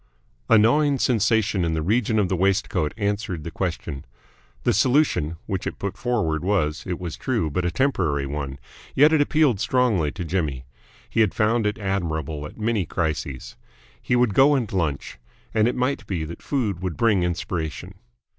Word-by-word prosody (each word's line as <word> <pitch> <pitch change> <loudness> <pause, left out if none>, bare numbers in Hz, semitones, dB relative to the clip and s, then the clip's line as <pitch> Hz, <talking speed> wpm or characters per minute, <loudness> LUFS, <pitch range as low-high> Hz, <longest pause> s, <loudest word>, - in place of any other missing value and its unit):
A - - +7
gnawing 140 +6 +4
sensation 110 -5 +2
in 80 -1 0
the 80 - -1
region 110 +4 +1
of 105 -3 +3
the 95 - 0
waistcoat 95 -3 +1
answered 100 -5 -2
the 85 - -6
question. 85 -6 -4 0.6
The - - +2
solution 120 - +2
which 95 -3 -3
it - - -5
put 100 -1 -4
forward 100 -11 -1
was, 90 -6 0
it 90 -2 -2
was 85 -4 -5
true, 110 - -1
but 90 +4 -1
a - - +2
temporary 85 - 0
one, 70 -1 -4 0.4
yet 150 +4 +6
it 155 - +4
appealed 145 -7 +2
strongly 110 - +1
to 90 -1 -5
Jimmy. 75 -7 -2 0.4
He - - -2
had 105 -4 +2
found 110 0 +2
it 105 - -2
admirable 80 -7 -2
at - - -14
many 110 -2 0
crises. 75 -6 -3 0.5
He 125 - 0
would 120 -4 +3
go 140 +6 +5
and 120 -7 -2
lunch, 80 -9 -2 0.3
and 110 0 +3
it 125 - 0
might 125 -4 -1
be 90 -5 -2
that 85 +2 -9
food 110 - -2
would 90 -4 -3
bring 110 -5 +3
inspiration. 90 0 -3
95 Hz, 175 wpm, -23 LUFS, 80-115 Hz, 0.6 s, A